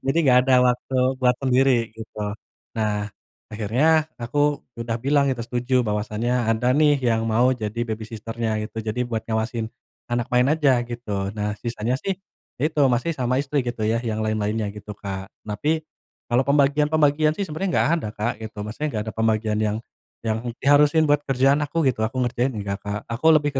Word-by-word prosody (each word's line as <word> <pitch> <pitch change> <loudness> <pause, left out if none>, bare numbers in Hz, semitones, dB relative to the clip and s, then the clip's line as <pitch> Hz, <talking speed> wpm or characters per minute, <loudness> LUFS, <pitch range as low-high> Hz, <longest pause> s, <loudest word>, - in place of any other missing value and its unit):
Jadi 135 +5 +2
enggak 125 -2 +6
ada 130 - +6
waktu 125 +1 0 0.2
buat 125 -1 +3
sendiri 130 -3 +3
gitu. 110 -1 -11 0.6
Nah, 105 -1 -1 0.4
akhirnya 140 +10 +2
aku 120 +4 -4 0.4
udah 115 -1 -2
bilang 140 0 +3
itu 130 -3 -1
setuju 125 +1 0
bahwasannya 105 +2 -1 0.2
ada 115 +3 +2
nih, 145 +1 +4
yang 115 0 +1
mau 120 +4 +3
jadi 110 -2 -4
babysitter-nya 110 +1 -4
gitu. 110 +1 -6
Jadi 110 +3 -2
buat 115 -2 -2
ngawasin 110 0 -1 0.4
anak 120 -1 -1
main 125 +1 +4
aja 145 -5 +3
gitu. 105 -5 -3
Nah, 105 0 -1
sisanya 120 0 -2
sih, 195 +2 -2 0.4
itu 150 +3 0
masih 125 +7 +1
sama 125 -4 -1
istri 140 +1 0
gitu 120 -3 -3
ya, 115 +2 +1
yang 110 -2 -2
lain-lainnya 110 -1 -1
gitu, 105 0 -9
Kak. 95 -2 -6 0.2
Tapi, 150 +10 -1 0.4
kalau 120 +1 +2
pembagian-pembagian 150 +2 +3
sih 200 - -1
sebenarnya 180 +3 -3
enggak - - +3
ada, 110 - -4
Kak, 110 +3 0
gitu. 110 -1 -8
Maksudnya, 115 +9 -3
enggak 110 -6 -2
ada 110 - -5
pembagian 110 -1 0
yang 105 -1 0 0.5
yang 110 0 0 0.2
diharusin 145 +3 +5
buat 145 0 +3
kerjaan 135 +2 +2
aku 150 +3 0
gitu. 130 -5 +1
Aku 110 +3 -1
ngerjain 120 +2 0
enggak, 100 -1 -3
Kak. 100 +1 -4
Aku 130 +8 +2
lebih 150 -2 +4
120 Hz, 175 wpm, -23 LUFS, 110-140 Hz, 0.6 s, enggak